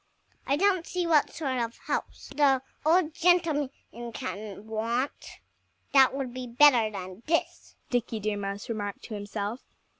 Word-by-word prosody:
"I 275 - +3
don't 370 +1 +2
see 360 -1 -1
what 315 -3 +4
sort 265 -5 -2
of 235 0 -3
house - - -4
the 275 -3 +4 0.2
old 320 0 +3
gentleman 330 -5 +3 0.5
can 200 +1 -6
want 230 +5 -3 0.5
that 270 -1 +6
would 265 -3 -3
be 255 -1 -5
better 240 -2 +6
than 185 -1 -7
this," 330 +1 -1 0.2
Dickie 240 -2 0
Deer 210 0 -1
Mouse 200 0 -4
remarked 205 -3 -4
to 225 - -8
himself. 205 +2 -4
250 Hz, 145 wpm, -28 LUFS, 215-295 Hz, 0.5 s, that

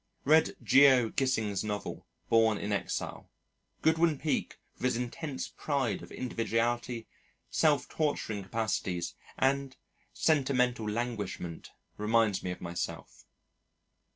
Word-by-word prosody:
Read 155 +3 +5
Geo. 135 -4 +6
Gissing's 110 -8 0
novel, 105 -1 -4 0.2
Born 110 -2 +4
in 105 - -3
Exile. 100 - -3 0.5
Godwin 160 -1 +3
Peak, 155 +2 -1 0.2
with - - -4
his 125 - +2
intense 130 +4 -4
pride 135 -9 -1
of - - -11
individuality, 120 -1 -1 0.5
self 150 -5 +3
torturing 145 -9 -1
capacities, 95 -4 -2 0.2
and 135 0 +1 0.3
sentimental 125 -7 +2
languishment, 105 -7 -4 0.3
reminds 105 -2 +2
me 90 - -4
of 90 - -5
myself. 85 0 -5
120 Hz, 105 wpm, -30 LUFS, 105-135 Hz, 0.5 s, Geo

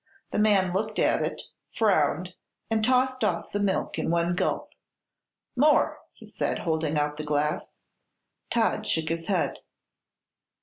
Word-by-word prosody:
The - - -1
man 200 -4 +3
looked 215 +3 -2
at - - +2
it, - - -3 0.3
frowned, 180 -4 +1 0.4
and 220 -1 +1
tossed 255 +1 +2
off 180 -5 -1
the 205 - -1
milk 200 -2 -1
in - - -1
one 170 +1 +1
gulp. 175 - -1 0.8
"More!" 290 +3 +3
he - - -15
said, - - -2
holding 160 -2 -1
out 150 0 0
the 155 - -4
glass. 150 0 -2 0.7
Todd 220 -2 +1
shook 160 -1 0
his 165 0 -3
head. 185 -4 0
185 Hz, 140 wpm, -27 LUFS, 160-215 Hz, 0.8 s, man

